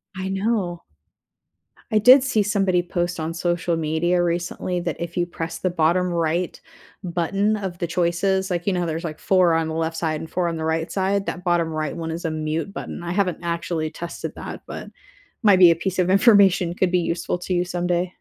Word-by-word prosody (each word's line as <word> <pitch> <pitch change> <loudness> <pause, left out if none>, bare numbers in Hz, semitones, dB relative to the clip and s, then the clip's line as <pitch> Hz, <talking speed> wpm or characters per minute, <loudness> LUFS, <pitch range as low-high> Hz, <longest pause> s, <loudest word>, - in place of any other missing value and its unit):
I 190 0 -4
know. 195 -3 -1 1.1
I 215 - +3
did 255 +5 +7
see 220 -6 +1
somebody 195 -4 +1
post 175 -1 -2
on 160 +1 -3
social 175 0 -1
media 165 +3 +1
recently, 175 +1 -2
that - - -2
if 170 +1 -5
you 175 - +2
press 165 -1 -5
the 185 - -1
bottom 175 +2 +2
right 170 +1 -1 0.4
button 195 +5 0
of 190 -4 -5
the 170 - -1
choices, 185 +3 0
like, 175 +2 -2
you 195 - +2
know, 180 - 0
how - - 0
there's, 165 +1 -3
like, 155 -2 -5
4 180 -3 +3
on 160 -1 0
the 160 - -4
left 165 0 -2
side 155 -2 -1
and 160 - -8
4 180 -1 -1
on 165 -1 -2
the 160 - -3
right 160 +1 -1
side, 195 +1 0
that 180 - -5
bottom 175 -2 +1
right 155 -1 -3
one 165 -1 -4
is 165 +1 -5
a 160 - 0
mute 155 +4 -3
button, - - -6
I 170 - -4
haven't 185 -2 0
actually 170 -2 -2
tested 170 +1 -6
that, - - -7
but - - -7 0.5
might 205 -4 +6
be 175 -2 +9
a - - +3
piece 185 +2 -3
of 180 0 +2
information 195 -4 +5
could 185 -2 +1
be 180 - +3
useful 175 +1 -2
to 180 +1 -3
you 175 0 +1
someday. 175 0 -1
175 Hz, 215 wpm, -23 LUFS, 165-185 Hz, 1.1 s, be